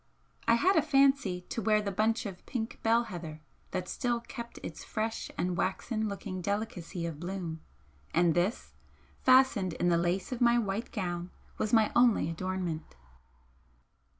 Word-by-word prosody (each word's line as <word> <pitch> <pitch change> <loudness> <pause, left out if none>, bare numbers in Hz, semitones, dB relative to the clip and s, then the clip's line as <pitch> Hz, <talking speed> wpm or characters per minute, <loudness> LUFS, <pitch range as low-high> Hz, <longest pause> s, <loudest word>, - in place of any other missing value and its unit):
I 230 - +6
had 375 +11 +3
a 320 - +6
fancy 275 -10 +3
to 230 - -2
wear 215 +1 +3
the 205 -1 -2
bunch 225 +4 +1
of 195 -3 -7
pink 225 -3 -4
bell 230 +1 +3
heather 170 -7 -7 0.3
that 180 -1 -3
still 240 +3 -1
kept 235 0 -8
its 160 -1 -7
fresh 220 +1 -3
and 180 0 0
waxen 215 +4 -1
looking 195 -2 -5
delicacy 195 -3 -3
of 165 -3 -5
bloom, 175 -2 -4 0.5
and 170 0 +3
this, 180 +7 -1 0.5
fastened 255 -9 +5
in 175 - +1
the 170 - +4
lace 175 +5 -1
of 250 - -4
my 240 0 +5
white 215 0 -2
gown, 175 -5 -3 0.3
was 215 - 0
my 220 -2 +4
only 235 -9 +4
adornment. 175 - -3
200 Hz, 155 wpm, -30 LUFS, 175-235 Hz, 0.5 s, I